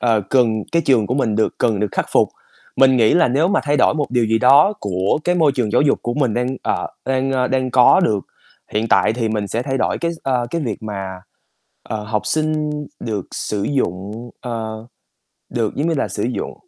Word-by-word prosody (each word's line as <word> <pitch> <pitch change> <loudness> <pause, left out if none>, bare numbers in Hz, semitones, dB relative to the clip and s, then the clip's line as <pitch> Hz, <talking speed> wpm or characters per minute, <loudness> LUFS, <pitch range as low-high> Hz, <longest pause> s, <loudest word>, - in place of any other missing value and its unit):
ờ, 115 -3 +2
cần 115 -4 +2
cái 170 0 +2
trường 120 -7 +3
của 125 - -1
mình 115 -6 0
được 110 - +1
cần 110 -5 +1
được 105 - +1
khắc - - -1
phục. - - +4 0.5
Mình 130 -1 +5
nghĩ 115 -3 +4
là 170 -6 +4
nếu 145 +7 +2
mà 200 - +2
thay 145 0 +1
đổi 135 - +3
một 150 -2 -1
điều 125 -2 +2
gì 110 +1 +2
đó 140 - +6
của 95 +2 0
cái 180 - +2
môi 160 -5 +3
trường 125 -5 -1
giáo - - +4
dục 145 - +2
của 120 - -2
mình 130 -6 0
đang, 125 +2 -1
ờ, - - -1 0.2
đang, 135 0 0
ơ, 125 -1 +1
đang 130 -1 0
có 125 +9 +6
được 110 - +1 0.5
hiện 110 +2 -1
tại - - +3
thì 115 -1 -2
mình 105 -2 -2
sẽ 115 +4 -2
thay 135 0 -2
đổi - - 0
cái 170 0 -1
s - - -13
ơ, 125 -3 0
cái 170 - -2
việc 115 -9 -4
mà, 100 -3 -5 0.8
ờ, 110 -1 -5
học 105 0 -2
sinh 155 -1 0 0.3
được 105 -5 -4
sử 105 -2 -3
dụng, 110 -2 -3
ờ, 110 -2 -5 0.6
được, 115 -3 -2
giống 145 +4 -1
như 170 - +1
là, 140 - -1
sử - - -4
dụng 125 +1 -3
125 Hz, 225 wpm, -19 LUFS, 110-140 Hz, 0.8 s, đó